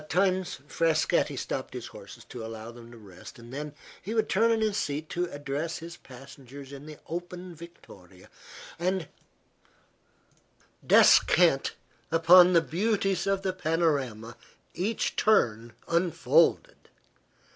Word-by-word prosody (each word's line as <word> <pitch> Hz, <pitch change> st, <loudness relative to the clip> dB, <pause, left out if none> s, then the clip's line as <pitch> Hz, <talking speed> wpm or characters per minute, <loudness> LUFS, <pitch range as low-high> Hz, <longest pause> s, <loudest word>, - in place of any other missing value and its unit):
At 150 Hz, -, -17 dB
times 185 Hz, 0 st, 0 dB
Frascatti 160 Hz, 0 st, +1 dB
stopped -, -, -5 dB
his -, -, -6 dB
horses -, -, -12 dB
to 120 Hz, -2 st, -9 dB
allow 110 Hz, 0 st, -8 dB
them 120 Hz, 0 st, -14 dB
to 120 Hz, -, -13 dB
rest, 95 Hz, -5 st, -13 dB
and 120 Hz, +1 st, -13 dB
then 150 Hz, +1 st, -6 dB, 0.3 s
he 215 Hz, +5 st, -5 dB
would 220 Hz, -, +1 dB
turn 225 Hz, +4 st, +3 dB
in 225 Hz, -1 st, +2 dB
his 215 Hz, -2 st, 0 dB
seat 150 Hz, -5 st, -3 dB
to 175 Hz, 0 st, -2 dB
address 145 Hz, +2 st, -4 dB
his 170 Hz, +1 st, -9 dB
passengers 135 Hz, +1 st, -13 dB
in 140 Hz, +2 st, -10 dB
the 155 Hz, -1 st, -10 dB
open 175 Hz, +1 st, -6 dB
victoria 100 Hz, -, -15 dB, 0.5 s
and 180 Hz, -2 st, -1 dB, 1.8 s
descant -, -, +4 dB, 0.4 s
upon 175 Hz, +2 st, +7 dB
the 170 Hz, -, +5 dB
beauties 195 Hz, +1 st, -1 dB
of 195 Hz, 0 st, 0 dB
the 190 Hz, -1 st, -1 dB
panorama 140 Hz, -10 st, -1 dB, 0.4 s
each 200 Hz, +7 st, -2 dB
turn 120 Hz, -, +1 dB
unfolded. 170 Hz, 0 st, +1 dB
165 Hz, 130 wpm, -27 LUFS, 135-185 Hz, 1.8 s, upon